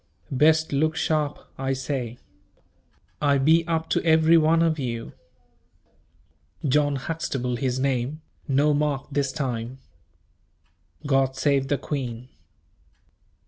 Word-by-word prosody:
Best 155 +3 +3
look 155 +3 +1
sharp 155 -2 0 0.2
I 135 0 0
say. 130 -3 -4 1.0
I 140 -1 +3
be 160 +5 +4
up 160 -1 -1
to - - +1
every 160 0 +5
one 165 +1 +4
of 160 -2 +1
you. 115 -3 -4 1.5
John 145 +1 +2
Huxtable 135 -4 -3
his 130 0 -1
name, 135 +3 -1 0.2
no 145 +2 +3
mark 145 -2 0
this 140 -1 0
time. 125 -2 -4 1.3
God 135 -2 +2
save 135 -1 +1
the 145 - +1
queen." 125 -3 -5
140 Hz, 110 wpm, -25 LUFS, 130-155 Hz, 1.5 s, every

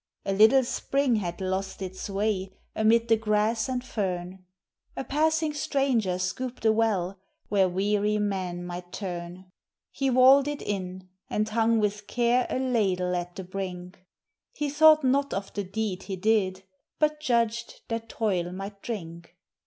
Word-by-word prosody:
A 195 - 0
little 220 +7 +6
spring 265 0 0
had 175 -4 -4
lost 190 +1 -3
its 190 +1 -6
way 195 -1 -1 0.2
amid 230 +2 +3
the 225 - +5
grass 220 +2 +1
and 250 -1 -2
fern, 185 -5 -3 0.5
A - - -2
passing 315 +2 +1
stranger 265 -10 0
scooped 230 +7 -4
a 220 - +6
well, 200 -4 0 0.3
where 195 -2 +3
weary 205 +3 +1
men 185 -4 -2
might 175 0 -7
turn; 180 -1 -6 0.4
He 270 -1 -1
walled 265 +2 +6
it 295 0 -4
in, 185 -2 -4 0.2
and 215 0 0
hung 225 +1 +2
with 210 -1 -1
care 245 +1 +2
a - - -1
ladle 195 -8 +1
at 175 0 -4
the 190 - -6
brink; 180 -1 -6 0.5
He 295 -1 -2
thought 310 +1 +6
not 275 +2 +1
of 195 0 -5
the 205 - -2
deed 195 0 -3
he 195 - -5
did, 190 -1 +1 0.3
but 305 0 +1
judged 235 -4 0
that 230 0 -4
toil 185 -7 -1
might 200 +2 -7
drink. 170 -6 -7
210 Hz, 155 wpm, -27 LUFS, 185-240 Hz, 0.5 s, little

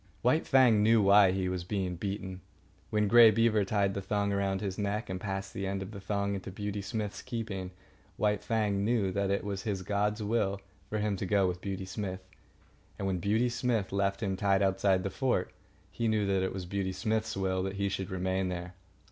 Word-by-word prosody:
White 130 +7 +2
Fang 125 -6 +5
knew 115 +2 +5
why 100 -1 +6
he 95 0 -1
was 90 -1 -2
being 95 -1 -2
beaten. 95 0 -5 0.5
When 105 -1 +1
Grey 115 +1 +8
Beaver 110 -1 +3
tied 100 -1 +1
the 100 - -3
thong 100 +1 0
around 100 -1 0
his 100 -1 -4
neck, 105 +1 -2
and 90 0 -4
passed 95 -1 -4
the 95 0 -3
end 95 0 -2
of 95 - -9
the 100 - -8
thong 100 0 -1
into 95 -1 -5
Beauty 105 +1 -4
Smith's 105 0 -4
keeping, 100 -6 -4 0.5
White 105 -1 +1
Fang 105 -3 0
knew 105 -3 +1
that 100 +1 0
it 100 - 0
was 100 -1 -3
his 100 -3 -3
god's 105 +2 0
will 100 -2 0 0.3
for 110 - -2
him 105 -1 0
to 95 - -3
go 100 0 +3
with 90 0 -3
Beauty 95 -1 -4
Smith. 95 -1 -5 0.7
And 100 - -3
when 95 -2 0
Beauty 110 +7 +2
Smith 120 -4 -1
left 100 +2 0
him 95 -2 0
tied 100 0 +2
outside 95 -1 +2
the 95 - -2
fort, 125 -9 0 0.4
he 115 - -1
knew 110 -2 +2
that 95 -1 +1
it 95 - -1
was 95 -1 -5
Beauty 95 0 -2
Smith's 110 0 -1
will 95 -1 0
that 95 +1 -3
he 100 0 0
should 95 -1 -3
remain 95 0 -1
there. 90 0 -5
100 Hz, 210 wpm, -30 LUFS, 95-105 Hz, 0.7 s, Grey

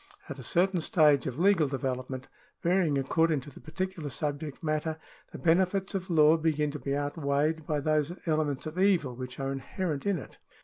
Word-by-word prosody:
At 145 -3 -7
a - - -7
certain 180 - +2
stage 150 -5 +4
of 130 -1 -4
legal 180 -3 +4
development, 130 -1 -3 0.4
varying 170 -4 +2
according 155 +2 +2
to 145 +3 -11
the - - -13
particular 180 -2 -4
subject 145 +1 -4
matter, 155 0 -1 0.3
the - - -7
benefits 185 +3 +2
of 190 -1 -3
law 155 -1 +5
begin 155 -2 0
to 150 - -6
be 140 0 -2
outweighed 145 +1 -1
by 150 -2 0
those 155 +1 +1
elements 155 -4 0
of 155 +3 -5
evil 180 -10 +2
which 130 +1 -7
are 135 0 -2
inherent 145 +4 -3
in 200 -2 +2
it. 140 - -10
155 Hz, 180 wpm, -29 LUFS, 140-170 Hz, 0.4 s, law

